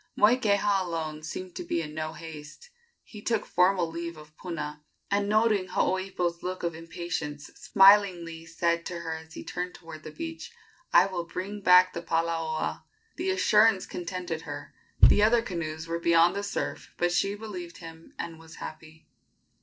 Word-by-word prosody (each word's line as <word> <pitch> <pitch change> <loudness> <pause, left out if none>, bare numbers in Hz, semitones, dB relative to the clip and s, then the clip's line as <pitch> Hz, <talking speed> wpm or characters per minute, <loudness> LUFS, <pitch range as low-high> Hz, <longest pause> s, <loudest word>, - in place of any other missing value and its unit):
Moikeha 205 -3 +4
alone 160 -3 -4
seemed 180 +4 -6
to - - -4
be 335 - -1
in 150 -2 -5
no 155 0 -4
haste. 160 - -10 0.3
He 210 - -11
took 225 -1 0
formal 180 -1 +3
leave 170 0 -5
of 155 0 -14
Puna, 150 -4 -5 0.3
and, 200 0 +1
noting 215 -3 +3
Hooipo's 180 -3 -1
look 185 0 -4
of 170 -1 -1
impatience, 160 -3 -5
smilingly 180 -5 +4
said 170 0 0
to 170 -1 -5
her 165 -1 -3
as 160 0 -13
he - - -7
turned 180 0 -4
toward 165 -2 -10
the - - -8
beach: 325 - -7 0.4
"I - - +7
will 180 -3 -3
bring 200 +4 -5
back 180 0 +6
the 170 - -4
palaoa!" 165 -1 -1 0.4
The 365 +2 -1
assurance 225 - +4
contented 175 -2 -4
her. 145 -2 -8 0.3
The - - +8
other 230 +2 +4
canoes 165 -5 -4
were 170 0 -2
beyond 170 +1 +4
the 200 - -1
surf, 200 - -4
but 175 0 +1
she 195 +3 +1
believed 185 -5 -7
him 165 -1 -12
and 165 -1 -6
was 160 0 -13
happy. 155 0 -10
170 Hz, 165 wpm, -28 LUFS, 165-195 Hz, 0.4 s, The